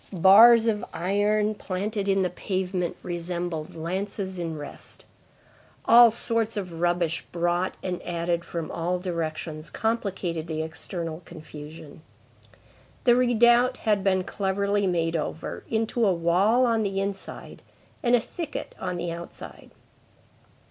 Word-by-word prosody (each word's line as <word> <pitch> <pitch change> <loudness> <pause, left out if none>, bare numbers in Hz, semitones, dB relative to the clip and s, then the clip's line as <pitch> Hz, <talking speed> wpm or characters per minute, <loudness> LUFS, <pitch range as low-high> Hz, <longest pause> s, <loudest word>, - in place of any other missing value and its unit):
Bars 220 +6 +7
of 215 -2 0
iron 205 +5 +1
planted 200 +1 -3
in 195 -1 +3
the 180 - -1
pavement 185 -1 -2
resembled 175 -2 -4
lances 190 +3 -4
in 165 -2 -3
rest. 145 - -8 0.8
All 235 0 +8
sorts 230 -1 -1
of 180 -5 -5
rubbish 175 -2 +1
brought 175 +1 0
and 180 -1 -3
added 170 0 -2
from 170 -2 -5
all 175 +2 -1
directions 160 -3 -4
complicated 190 -8 -2
the 160 -1 -2
external 160 0 -5
confusion. 155 -1 -11 1.0
The 240 -1 +5
redoubt 245 +1 +4
had 210 -3 +2
been 190 -1 +2
cleverly 200 +1 0
made 165 -2 0
over, 160 0 -4
into 225 +1 0
a 195 -4 +4
wall 190 +9 +3
on 230 -2 +2
the 195 -2 -1
inside 195 0 -5 0.4
and 245 -1 +4
a - - +4
thicket 325 +7 -6
on 180 -1 -3
the 175 -1 -3
outside. 170 +1 -9
185 Hz, 125 wpm, -26 LUFS, 170-210 Hz, 1.0 s, All